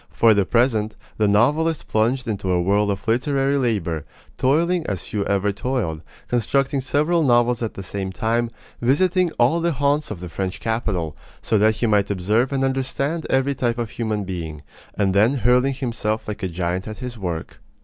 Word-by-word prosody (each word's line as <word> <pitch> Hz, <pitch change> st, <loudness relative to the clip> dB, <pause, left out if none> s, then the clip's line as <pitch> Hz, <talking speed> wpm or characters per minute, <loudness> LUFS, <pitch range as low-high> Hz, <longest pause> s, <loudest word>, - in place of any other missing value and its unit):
For 115 Hz, -1 st, +4 dB
the 100 Hz, -2 st, +2 dB
present, 115 Hz, -3 st, +1 dB, 0.2 s
the 105 Hz, -, +3 dB
novelist 150 Hz, +10 st, +2 dB
plunged 120 Hz, +4 st, +1 dB
into 100 Hz, -4 st, -2 dB
a 90 Hz, -, +2 dB
whirl 100 Hz, +3 st, +2 dB
of 100 Hz, +2 st, -3 dB
literary 135 Hz, +4 st, +1 dB
labor, 95 Hz, -, -1 dB, 0.3 s
toiling 165 Hz, +7 st, +2 dB
as 95 Hz, -4 st, -3 dB
few 105 Hz, -2 st, -2 dB
ever 100 Hz, 0 st, +1 dB
toiled 100 Hz, -7 st, -2 dB, 0.3 s
constructing 135 Hz, +3 st, +1 dB
several 150 Hz, +6 st, +1 dB
novels 120 Hz, -3 st, +3 dB
at 115 Hz, -, -3 dB
the 95 Hz, -, -6 dB
same 95 Hz, 0 st, -4 dB
time, 115 Hz, +5 st, 0 dB, 0.3 s
visiting 180 Hz, +8 st, +3 dB
all 125 Hz, +8 st, +3 dB
the 170 Hz, 0 st, +1 dB
haunts 145 Hz, +2 st, +1 dB
of 105 Hz, -, -6 dB
the 90 Hz, -, -6 dB
French 95 Hz, +2 st, -4 dB
capital, 100 Hz, -9 st, -2 dB, 0.3 s
so 110 Hz, -, +2 dB
that 110 Hz, +1 st, +4 dB
he 115 Hz, -, -1 dB
might 105 Hz, -3 st, +2 dB
observe 105 Hz, +7 st, +1 dB
and 135 Hz, -1 st, 0 dB
understand 135 Hz, +4 st, -1 dB
every 135 Hz, +1 st, +2 dB
type 120 Hz, -3 st, -1 dB
of 115 Hz, -3 st, -3 dB
human 110 Hz, -2 st, -2 dB
being, 80 Hz, -5 st, -6 dB, 0.3 s
and 95 Hz, -2 st, +2 dB
then 110 Hz, +7 st, +4 dB
hurling 125 Hz, +2 st, +3 dB
himself 115 Hz, -4 st, -2 dB
like 105 Hz, 0 st, -5 dB
a 95 Hz, -, -1 dB
giant 90 Hz, +2 st, -3 dB
at 110 Hz, -, -6 dB
his 125 Hz, -2 st, -6 dB
work. 90 Hz, -6 st, -5 dB
115 Hz, 180 wpm, -22 LUFS, 100-135 Hz, 0.3 s, For